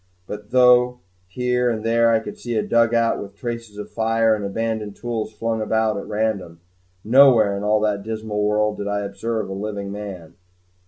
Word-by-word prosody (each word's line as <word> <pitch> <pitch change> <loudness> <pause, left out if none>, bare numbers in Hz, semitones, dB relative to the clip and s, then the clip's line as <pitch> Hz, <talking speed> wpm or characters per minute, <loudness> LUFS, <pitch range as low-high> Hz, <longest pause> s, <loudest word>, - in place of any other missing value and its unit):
But 105 +1 -8
though 125 0 +5 0.3
here 125 +5 0
and 110 -2 -3
there 115 0 +3
I 115 - +4
could 105 - -8
see 120 -1 -5
a 105 - +1
dugout, 115 0 +2
with 100 0 -9
traces 115 -1 -6
of 105 0 -7
fire 115 0 +2
and 105 -1 -2
abandoned 110 0 -3
tools 115 -2 -4
flung 110 +1 -2
about 110 0 +1
at 100 - -6
random, 105 -6 -2 0.4
nowhere 115 -4 +5
in 100 - -4
all 105 +1 +2
that 105 -2 0
dismal 110 0 -4
world 105 0 +1
did 100 - -3
I 100 0 -1
observe 100 +2 -3
a 95 - -5
living 100 0 -5
man. 100 -5 -8
110 Hz, 180 wpm, -22 LUFS, 105-115 Hz, 0.4 s, though